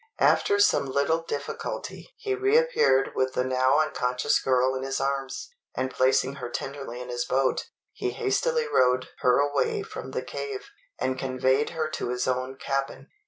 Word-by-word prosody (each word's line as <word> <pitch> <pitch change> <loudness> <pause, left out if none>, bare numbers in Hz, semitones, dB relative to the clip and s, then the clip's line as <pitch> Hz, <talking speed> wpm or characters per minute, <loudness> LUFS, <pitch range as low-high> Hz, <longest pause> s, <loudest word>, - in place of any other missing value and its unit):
After 410 -1 +3
some 405 - +4
little 140 +5 +1
difficulty 145 - -5
he 405 - -2
reappeared 400 - +3
with 130 0 0
the 125 - +2
now 130 +2 +2
unconscious 125 -5 +1
girl 130 0 +2
in 130 - -3
his 135 0 -2
arms; 140 - -2 0.2
and 130 0 -1
placing 130 +1 +2
her 125 -3 -5
tenderly 135 -1 -5
in 125 0 -7
his 120 0 -1
boat, 135 0 0 0.3
he - - -2
hastily 465 +2 0
rowed 125 - +2
her 125 -1 +4
away 145 - +1
from 435 0 -8
the - - -3
cave, 415 -2 -6 0.3
and 130 0 -1
conveyed 130 +2 +1
her 160 -2 -2
to 155 - -4
his 125 0 -1
own 130 +1 -1
cabin. 135 0 -3
135 Hz, 165 wpm, -26 LUFS, 130-165 Hz, 0.3 s, some